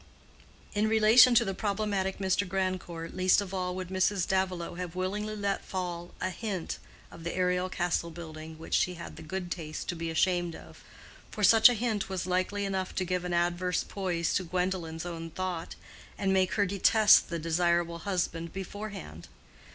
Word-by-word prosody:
In 210 Hz, +1 st, +2 dB
relation 220 Hz, +3 st, +7 dB
to 235 Hz, -, +5 dB
the 195 Hz, -, -2 dB
problematic 200 Hz, -1 st, -1 dB
Mr. 190 Hz, 0 st, +1 dB
Grandcourt 185 Hz, -3 st, -3 dB
least 185 Hz, +1 st, +4 dB
of 195 Hz, -2 st, -4 dB
all 180 Hz, -1 st, -2 dB
would 185 Hz, -1 st, -5 dB
Mrs. 190 Hz, 0 st, +1 dB
Davilow 185 Hz, -2 st, -1 dB
have 180 Hz, -1 st, -6 dB
willingly 205 Hz, +4 st, -2 dB
let 200 Hz, -1 st, -1 dB
fall 175 Hz, -2 st, -4 dB
a 185 Hz, -, -1 dB
hint 195 Hz, -4 st, -4 dB, 0.3 s
of 165 Hz, -, -11 dB
the 170 Hz, -, -3 dB
aerial 180 Hz, 0 st, +1 dB
castle 175 Hz, -2 st, -1 dB
building 160 Hz, -1 st, -9 dB
which 160 Hz, -, -8 dB
she 180 Hz, -, +2 dB
had 170 Hz, -, -8 dB
the -, -, -10 dB
good 175 Hz, +2 st, -5 dB
taste 155 Hz, -3 st, -5 dB
to 175 Hz, -, -1 dB
be 165 Hz, 0 st, -4 dB
ashamed 175 Hz, +1 st, +1 dB
of; 80 Hz, 0 st, -13 dB, 0.5 s
for 210 Hz, -, -5 dB
such 220 Hz, +4 st, +8 dB
a 245 Hz, -, +1 dB
hint 220 Hz, -3 st, -1 dB
was 190 Hz, -3 st, -2 dB
likely 185 Hz, +2 st, 0 dB
enough 190 Hz, -1 st, -2 dB
to 185 Hz, -, 0 dB
give 180 Hz, 0 st, -1 dB
an 180 Hz, -, -2 dB
adverse 175 Hz, +1 st, +1 dB
poise 180 Hz, -4 st, -1 dB
to 185 Hz, -, +1 dB
Gwendolen's 180 Hz, -2 st, -2 dB
own 165 Hz, -1 st, -5 dB
thought, 180 Hz, 0 st, -4 dB, 0.4 s
and 195 Hz, -1 st, +1 dB
make 190 Hz, -1 st, +2 dB
her 205 Hz, -, +3 dB
detest 205 Hz, +3 st, +5 dB
the 170 Hz, -, -2 dB
desirable 170 Hz, +1 st, +1 dB
husband 170 Hz, -3 st, -2 dB
beforehand. 195 Hz, -, -7 dB
185 Hz, 175 wpm, -29 LUFS, 170-195 Hz, 0.5 s, such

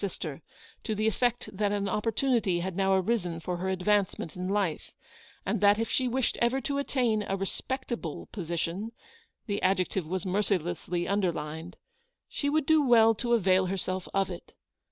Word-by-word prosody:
sister, 170 Hz, -6 st, -4 dB, 0.4 s
to 220 Hz, -, -2 dB
the 215 Hz, +1 st, 0 dB
effect 240 Hz, +2 st, +1 dB
that 205 Hz, +1 st, +1 dB
an 200 Hz, -1 st, 0 dB
opportunity 210 Hz, -2 st, +1 dB
had 185 Hz, 0 st, -3 dB
now 195 Hz, 0 st, +2 dB
arisen 185 Hz, -4 st, 0 dB
for 180 Hz, +1 st, -3 dB
her 185 Hz, +2 st, -2 dB
advancement 190 Hz, -2 st, 0 dB
in 180 Hz, 0 st, -3 dB
life; 195 Hz, -6 st, -1 dB, 0.5 s
and 200 Hz, +2 st, -1 dB
that 205 Hz, 0 st, +6 dB
if 225 Hz, +1 st, -1 dB
she 255 Hz, -, +2 dB
wished 255 Hz, 0 st, 0 dB
ever 240 Hz, +3 st, +3 dB
to 280 Hz, +2 st, -2 dB
attain 245 Hz, -6 st, +1 dB
a 195 Hz, -1 st, -2 dB
respectable 230 Hz, -, -4 dB
position 175 Hz, +3 st, -3 dB, 0.3 s
— 465 Hz, -, -37 dB
the 205 Hz, -1 st, -2 dB
adjective 185 Hz, -2 st, +1 dB
was 185 Hz, +2 st, -2 dB
mercilessly 180 Hz, -3 st, -1 dB
underlined 170 Hz, -4 st, -2 dB, 0.3 s
— -, -, -52 dB
she 285 Hz, -, +1 dB
would 310 Hz, 0 st, +1 dB
do 315 Hz, 0 st, +5 dB
well 225 Hz, -3 st, +6 dB
to 240 Hz, +2 st, -1 dB
avail 190 Hz, -3 st, +3 dB
herself 185 Hz, 0 st, -3 dB
of 195 Hz, -1 st, +1 dB
it. 175 Hz, -, -9 dB
195 Hz, 170 wpm, -29 LUFS, 180-230 Hz, 0.5 s, that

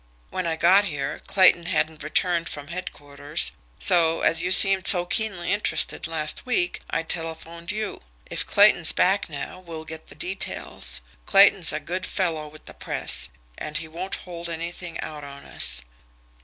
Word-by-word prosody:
When 185 Hz, -2 st, -4 dB
I 165 Hz, -, -1 dB
got 185 Hz, +5 st, +4 dB
here, 140 Hz, -6 st, -5 dB
Clayton 185 Hz, -3 st, +4 dB
hadn't 160 Hz, -3 st, -1 dB
returned 170 Hz, +2 st, -1 dB
from 145 Hz, 0 st, -8 dB
headquarters, 145 Hz, -5 st, -4 dB, 0.3 s
so, 165 Hz, -, +4 dB
as 165 Hz, -, +2 dB
you 180 Hz, +1 st, -2 dB
seemed 195 Hz, 0 st, +6 dB
so 175 Hz, -3 st, +6 dB
keenly 195 Hz, -3 st, -2 dB
interested 205 Hz, -4 st, -1 dB
last 155 Hz, -2 st, -1 dB
week, 200 Hz, -9 st, -1 dB
I 165 Hz, -, -2 dB
telephoned 165 Hz, +1 st, -5 dB
you. 215 Hz, -1 st, -5 dB, 0.2 s
If -, -, -4 dB
Clayton's -, -, +6 dB
back -, -, +1 dB
now -, -, -7 dB
we'll 165 Hz, -3 st, -10 dB
get 160 Hz, 0 st, -10 dB
the -, -, -14 dB
details. 190 Hz, +2 st, -3 dB, 0.3 s
Clayton's 195 Hz, -3 st, +4 dB
a -, -, -3 dB
good 180 Hz, +5 st, -6 dB
fellow 160 Hz, -5 st, -2 dB
with 155 Hz, +1 st, -17 dB
the -, -, -11 dB
'press,' -, -, -2 dB, 0.3 s
and 155 Hz, 0 st, -5 dB
he 160 Hz, -, -7 dB
won't 175 Hz, +5 st, -6 dB
hold 170 Hz, -1 st, -8 dB
anything 170 Hz, +1 st, -7 dB
out 150 Hz, -1 st, -8 dB
on 140 Hz, 0 st, -12 dB
us. -, -, +6 dB
170 Hz, 160 wpm, -23 LUFS, 160-185 Hz, 0.3 s, seemed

